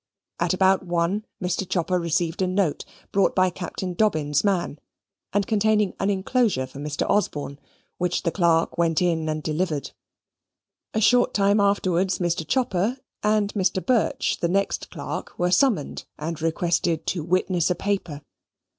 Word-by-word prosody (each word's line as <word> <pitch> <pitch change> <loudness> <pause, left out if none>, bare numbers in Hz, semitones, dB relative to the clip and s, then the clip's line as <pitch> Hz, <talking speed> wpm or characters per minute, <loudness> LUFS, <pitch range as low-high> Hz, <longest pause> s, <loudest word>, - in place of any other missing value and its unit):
At - - +1
about 190 +1 +3
one 175 +4 -1
Mr. 185 0 -2
Chopper 180 0 0
received 170 +1 -1
a 185 - +2
note 185 -4 0 0.3
brought 195 -1 +2
by 185 -1 +3
Captain 180 +1 -5
Dobbin's 155 -8 +1
man, 180 -7 0 0.5
and 200 0 +1
containing 210 -1 +2
an 195 - +1
inclosure 200 - +1
for 130 +2 -11
Mr. 150 0 -2
Osborne, 145 -8 -1 0.4
which 180 -1 0
the 170 - 0
clerk 170 -2 +1
went 165 -2 +2
in 165 -3 0
and 155 0 -3
delivered. 155 -2 -2 1.0
A 220 - +2
short 245 +3 +4
time 200 +1 +3
afterwards 190 -2 +2
Mr. 170 -3 -1
Chopper 240 -1 0 0.2
and 210 -1 +1
Mr. 190 -2 0
Birch, 250 -4 +1
the 170 - 0
next 195 +2 -1
clerk, - - -6
were 175 0 +1
summoned, 200 - +1
and 160 +1 -5
requested 165 0 0
to 170 -5 -2
witness 180 0 +1
a 180 - +1
paper. 175 -7 -3
180 Hz, 150 wpm, -24 LUFS, 165-200 Hz, 1.0 s, short